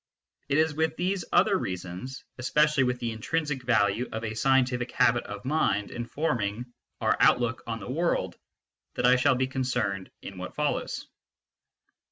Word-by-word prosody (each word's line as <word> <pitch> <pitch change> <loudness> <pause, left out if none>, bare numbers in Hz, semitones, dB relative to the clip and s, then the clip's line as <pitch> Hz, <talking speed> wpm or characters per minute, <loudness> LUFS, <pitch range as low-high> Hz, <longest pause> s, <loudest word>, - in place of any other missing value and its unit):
It 140 - +2
is 160 0 +3
with 160 +1 0
these 185 +1 -1
other 200 +2 +4
reasons, 90 +8 -5 0.2
especially 150 +3 +3
with 125 0 0
the 120 -1 -2
in 110 - -7
trinsic 150 -1 -1
value 115 -1 +2
of 110 +1 -4
a 110 -1 -3
scientific 125 +1 +2
habit 120 0 +3
of 100 +2 -8
mind 130 -8 +1
in 120 0 -5
forming 120 -6 -1 0.4
our - - +3
outlook 120 -1 +3
on 115 -1 -3
the 100 - -8
world, 170 +5 0 0.6
that - - 0
I 125 +1 +7
shall 130 +1 +3
be 130 +1 +1
concerned 125 -7 -2
in 95 -2 -8
what 90 - -7
follows. 150 -1 -2
125 Hz, 165 wpm, -27 LUFS, 110-150 Hz, 0.6 s, I